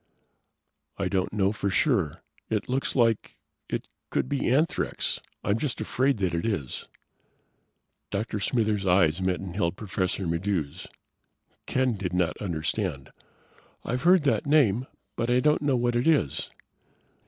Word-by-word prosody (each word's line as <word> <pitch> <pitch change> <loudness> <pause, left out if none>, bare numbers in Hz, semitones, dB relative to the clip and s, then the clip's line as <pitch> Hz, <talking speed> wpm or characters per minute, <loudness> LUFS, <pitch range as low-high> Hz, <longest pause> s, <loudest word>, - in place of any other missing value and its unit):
"I - - 0
don't 95 -1 0
know 100 -2 +2
for 100 -2 -2
sure. 95 - +1 0.3
It 105 -2 -1
looks 130 +2 -1
like 115 -4 +2 0.3
it - - -3 0.2
could - - 0
be 140 -4 0
anthrax. 150 +7 +1 0.2
I'm 100 +3 +1
just 140 -3 -2
afraid 130 +1 +1
that 95 -4 0
it 85 - -1
is." 95 - -2 1.2
Dr. 105 +1 -2
Smithers' 105 -3 0
eyes 90 -1 +4
met 95 -1 +1
and 90 -2 -7
held 85 -3 0
Professor 95 -2 -2
Maddox's. 85 -3 -2 0.8
Ken 130 -4 +1
did 90 -2 -3
not 90 -2 +1
understand. 80 -6 -2 0.7
"I've 125 +1 -1
heard 180 0 +5
that 140 0 +1
name, 130 -5 +3 0.3
but 115 - -1
I 125 +1 +4
don't 150 +3 +3
know 140 -3 +2
what 120 0 +1
it 120 +5 +1
is." 150 - +2
105 Hz, 140 wpm, -27 LUFS, 95-125 Hz, 1.2 s, heard